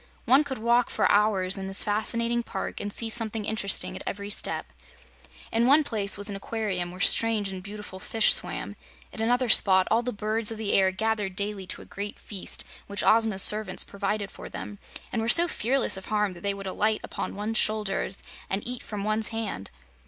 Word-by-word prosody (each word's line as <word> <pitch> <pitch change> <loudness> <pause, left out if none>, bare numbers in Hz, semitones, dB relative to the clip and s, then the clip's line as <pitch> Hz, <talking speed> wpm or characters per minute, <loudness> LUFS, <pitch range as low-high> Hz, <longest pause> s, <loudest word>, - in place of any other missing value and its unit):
One 270 +4 +5
could 275 -2 -5
walk 235 +2 +2
for - - +1
hours 200 -2 +2
in 190 - -5
this 195 0 +3
fascinating 230 +3 0
park - - -5
and 205 - -4
see 230 - 0
something 225 -1 0
interesting 205 -2 -1
at - - -7
every 200 +1 -5
step. - - -3 0.8
In 230 +2 +2
one 295 +4 +5
place 210 -7 +3
was 205 0 -2
an 205 - -3
aquarium, 195 -4 -3
where 180 +1 -11
strange 215 0 +4
and 190 -1 -6
beautiful 200 -1 -9
fish 220 +3 +3
swam; - - -3 0.4
at 220 - -6
another 245 +3 +1
spot 190 -4 +4
all 225 +2 +3
the 250 +1 -3
birds 215 +1 0
of 225 - -5
the 215 -2 -1
air 190 -1 +4
gathered 210 -1 -2
daily 200 -2 -3
to - - -5
a - - -16
great 205 +1 -6
feast 200 -3 -4 0.2
which 200 0 -2
Ozma's 220 -3 +4
servants 210 -3 +5
provided 200 0 -3
for - - -10
them, 205 -1 -8 0.3
and 230 - 0
were 225 - -1
so 340 +7 +6
fearless 250 - +1
of 190 - -9
harm 210 -2 0
that 175 - -13
they 200 +1 -1
would 195 0 -8
alight 215 +3 0
upon - - -5
one's 215 +2 -1
shoulders 210 -2 0 0.3
and 195 +4 -2
eat 250 0 -2
from 205 -2 -6
one's 215 +1 0
hand. 225 - -5
210 Hz, 200 wpm, -26 LUFS, 195-225 Hz, 0.8 s, so